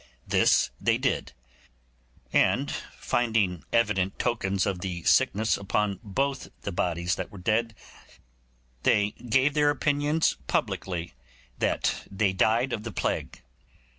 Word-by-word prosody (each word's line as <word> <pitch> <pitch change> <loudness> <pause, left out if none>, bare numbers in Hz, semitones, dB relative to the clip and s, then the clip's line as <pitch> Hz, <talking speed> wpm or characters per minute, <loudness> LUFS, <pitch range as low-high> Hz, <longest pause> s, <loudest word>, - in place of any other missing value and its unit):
This - - +3
they - - +3
did; - - -1 1.0
and - - +3 0.3
finding 110 -7 0
evident 100 -5 +1
tokens 100 -6 0
of 95 -3 -2
the 90 -3 -4
sickness 110 +2 +3
upon 100 0 -1
both 135 +6 -2 0.2
the 100 - -3
bodies 85 0 -1
that - - -4
were 100 - -12
dead, 110 +4 0 1.1
they 105 +8 +3
gave 130 +5 +1
their 150 0 +3
opinions 145 +2 +1
publicly 90 -5 -2 0.5
that - - 0
they 100 -1 +1
died 115 +6 +2
of 105 - -2
the 115 +1 -6
plague. - - -3
105 Hz, 120 wpm, -27 LUFS, 95-120 Hz, 1.1 s, This